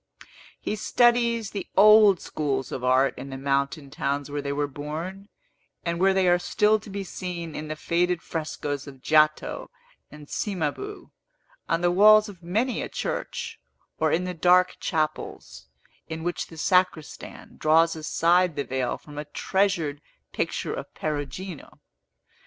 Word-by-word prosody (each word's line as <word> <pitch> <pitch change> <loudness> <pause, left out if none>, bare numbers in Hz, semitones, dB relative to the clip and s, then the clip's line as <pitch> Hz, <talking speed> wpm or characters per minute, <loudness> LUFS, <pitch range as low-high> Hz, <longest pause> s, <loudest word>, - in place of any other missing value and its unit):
He - - -3
studies 235 -1 +2
the 200 - -5
old 210 -2 +7
schools 135 -4 -3
of 125 - -5
art 130 +2 +3
in 135 - -7
the 135 - -6
mountain 140 +1 -1
towns 140 0 -2
where 145 0 -2
they 140 0 -3
were 145 +1 0
born, 160 +8 -6 0.6
and 170 0 -1
where 195 +1 +4
they 190 -1 +3
are 175 0 +4
still 210 +4 +2
to 210 - -13
be 200 0 -4
seen 175 -3 -6
in 155 - -5
the 155 - -4
faded 175 +2 0
frescos 145 -4 -4
of 135 -2 -12
Giotto 155 - +2 0.4
and 150 -1 -12
Cimabue, 200 - -4 0.6
on 165 - +1
the 175 0 +3
walls 215 +3 +7
of 190 -4 -11
many 220 +9 -1
a - - -4
church, - - -4 0.4
or 155 -1 +2
in 175 - +1
the 180 0 -3
dark 180 +2 +4
chapels, 150 - -3 0.4
in 160 0 -6
which 175 0 -2
the 165 - -13
sacristan 180 -3 -1
draws 165 +2 +4
aside 170 +2 +2
the 140 - -1
veil 130 -2 -2
from 150 -1 -10
a 150 - -5
treasured 170 -3 0 0.3
picture - - -2
of - - -6
Perugino. 155 +3 -5
165 Hz, 150 wpm, -25 LUFS, 145-190 Hz, 0.6 s, old